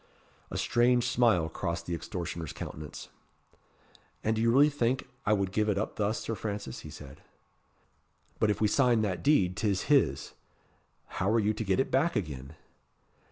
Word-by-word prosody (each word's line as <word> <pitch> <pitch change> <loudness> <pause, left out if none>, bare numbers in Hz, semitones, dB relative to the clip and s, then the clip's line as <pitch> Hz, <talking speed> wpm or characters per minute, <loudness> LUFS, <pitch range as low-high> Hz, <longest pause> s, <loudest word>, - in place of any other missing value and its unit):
A - - -4
strange 120 0 +3
smile 115 -10 +3
crossed 85 +1 -4
the 85 - -3
extortioner's 85 -2 -5
countenance. 75 -1 -8 1.1
"And 110 +1 +1
do 110 - -1
you 115 - +3
really 140 +4 +6
think 130 -2 0 0.2
I 105 - +5
would 100 -2 0
give 105 +1 +1
it 100 - +1
up 110 - -3
thus, 105 +1 0
Sir 115 - -3
Francis?" 100 - -5
he - - -10
said. 70 0 -11 1.2
"But 110 - +3
if 105 - 0
we 110 - +3
sign 120 -1 +3
that 95 -4 -2
deed 100 -12 +3
'tis 105 +5 -1
his. 70 - +2 0.7
How 95 - -2
are 115 +2 +3
you 105 0 +1
to 110 - -4
get 95 +1 +1
it 135 - 0
back 155 +6 +2
again?" 70 -4 -4
105 Hz, 170 wpm, -29 LUFS, 85-115 Hz, 1.2 s, really